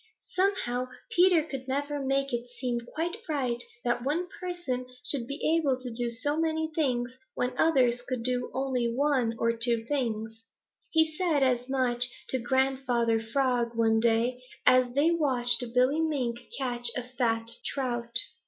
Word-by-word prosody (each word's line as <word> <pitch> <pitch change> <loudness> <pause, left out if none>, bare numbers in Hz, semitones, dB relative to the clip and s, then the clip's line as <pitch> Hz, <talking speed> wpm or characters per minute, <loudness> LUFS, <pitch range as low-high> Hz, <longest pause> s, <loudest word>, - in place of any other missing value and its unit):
Somehow 365 -11 +1 0.2
Peter 355 -3 +5
could 270 -4 -7
never 285 +1 -2
make 275 0 0
it 240 0 -2
seem 245 -1 -1
quite 325 - -4
right 255 -5 -1 0.2
that 240 0 0
one 320 +7 0
person 345 -9 -3 0.2
should 250 -5 0
be 310 +3 0
able 280 -6 +1
to 250 -2 -6
do 240 +1 0
so 290 +6 0
many 320 0 0
things 250 -5 0 0.2
when 250 0 -1
others 250 -5 +3
could 250 -1 -4
do 250 0 -1
only 255 -3 0
one 255 -3 +1
or 230 0 +2
two 230 -1 0
things. 225 -5 -2 0.5
He 320 -1 +3
said 315 -5 +2
as 250 -1 +1
much 250 -2 +1 0.2
to 260 - +2
Grandfather 250 -2 +1
Frog 240 0 0
one 225 -1 +3
day, 235 +2 +2 0.2
as 255 -1 +6
they 300 +4 +4
watched 260 -7 +2
Billy 260 +5 +3
Mink 255 -7 -2
catch 245 -3 -1
a 250 - -2
fat 235 -2 -1
trout. 240 -3 -3
255 Hz, 155 wpm, -28 LUFS, 240-285 Hz, 0.5 s, as